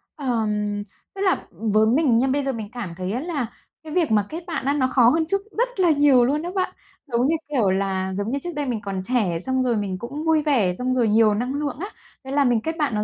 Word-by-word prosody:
Ờm, 210 -6 -1 0.3
tức 390 - -5
là 380 -2 +1
với 215 +3 +1
mình 255 -1 +3
nha 260 +3 +2
bây 280 +1 +1
giờ 270 - 0
mình 220 -3 -6
cảm 235 -9 -6
thấy 185 0 -3
á 235 - -1
là 310 -7 -2 0.4
cái 310 -1 -8
việc 340 -8 +1
mà 210 -2 +3
kết 330 +2 -6
bạn 320 -6 -3
á 280 - +2
nó 260 -3 +2
khó 245 -2 +5
hơn 320 +4 +2
trước 395 +4 0 0.2
rất - - -1
là 355 -2 +4
nhiều 285 -4 +5
luôn 290 +4 0
á 350 - -3
bạn. 370 - 0 0.4
Giống 240 +3 +2
như, 325 - +2 0.2
kiểu, 225 -8 +3
là 190 0 -1
giống 205 +3 -2
như 280 - -1
trước 350 - -3
đây 290 -1 -2
mình 235 -5 -2
còn 195 -2 -4
trẻ 200 -8 0
xong 260 +6 0
rồi 240 -3 +1
mình 195 -3 -2
cũng 280 +6 -6
vui 320 -1 +3
vẻ, 240 -12 +2
xong 255 +5 -1
rồi 240 -3 +2
nhiều 215 0 +4
năng 245 +5 -2
lượng 285 -2 -3
á, 395 - -3 0.4
thế 265 - -6
là 285 0 +3
mình 240 -3 +2
kết 320 +5 -3
bạn 285 -8 0
nó 210 - 0
250 Hz, 265 wpm, -23 LUFS, 210-295 Hz, 0.4 s, khó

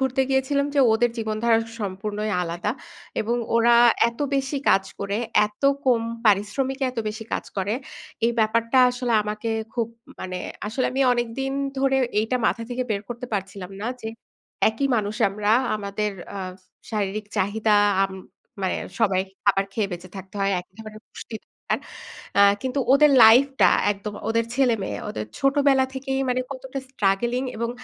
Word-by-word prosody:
ঘুরতে 265 0 +1
গিয়েছিলাম 280 +2 +1
যে, 280 - +4
ওদের 240 +2 +2
জীবনধারা 225 +1 +1 0.2
সম্পূর্ণই 210 +2 -3
আলাদা। 175 +4 -2 0.5
এবং 235 +3 0 0.2
ওরা 235 +1 +5 0.3
এত 235 +3 -11
বেশি 275 +1 -1
কাজ 195 - +4 0.2
করে, 200 0 -2 0.3
এত 210 +5 -18 0.2
কম 250 -3 +3 0.3
পারিশ্রমিকে, 260 +7 +1
এত 250 - -8
বেশি 220 +1 -6
কাজ - - -1
করে। 195 +1 -1 0.5
এই 235 - +1
ব্যাপারটা 230 +3 +2
আসলে 245 -1 -2
আমাকে 210 +2 -4 0.3
খুব 235 -2 0 0.3
মানে 185 0 -4 0.3
আসলে 240 +5 -1
আমি 270 - -1
অনেকদিন 245 +3 -2 0.3
ধরে 270 0 +2 0.2
এইটা 225 +4 0
মাথা 230 - 0
থেকে 250 +1 -1
বের 200 -2 -1
করতে 240 +1 -6
পারছিলাম 195 -2 -4
না, - - -2 0.2
যে 220 - -4 0.6
একই 225 +6 -1
মানুষ 210 -1 -1
আমরা, 205 +1 -1 0.3
আমাদের 210 +1 -3 0.2
এ্যাঁ 190 -2 -5 0.4
শারীরিক 210 -1 -2
চাহিদা, 210 +2 +1 0.3
আম 195 0 -1 0.5
মানে 185 - 0 0.2
সবাই 195 -4 +3 0.2
খাবার 195 -1 +3
খেয়ে 205 -1 -1
বেঁচে 175 +1 -7
থাকতে 190 +1 -10
হয়। 195 0 +2
একই 180 +1 -20
ধরনের 215 0 -10
পুষ্টি 225 - -10
দরকার। - - -4 0.6
এ্যাঁ 200 0 +6
কিন্তু 260 +1 -2
ওদের 295 +1 +6
লাইফ 235 +5 +8 0.2
টা - - +8 0.2
একদম 205 +1 -6 0.2
ওদের 230 0 +1
ছেলেমেয়ে, 230 - +1
ওদের 110 -1 -4
ছোটবেলা 275 -1 +3
থেকেই 270 0 -2
মানে 250 0 +1
কতটা 265 0 -6
স্ট্রাগলিং 240 +2 0
এবং 230 +1 -2
220 Hz, 155 wpm, -24 LUFS, 200-255 Hz, 0.6 s, লাইফ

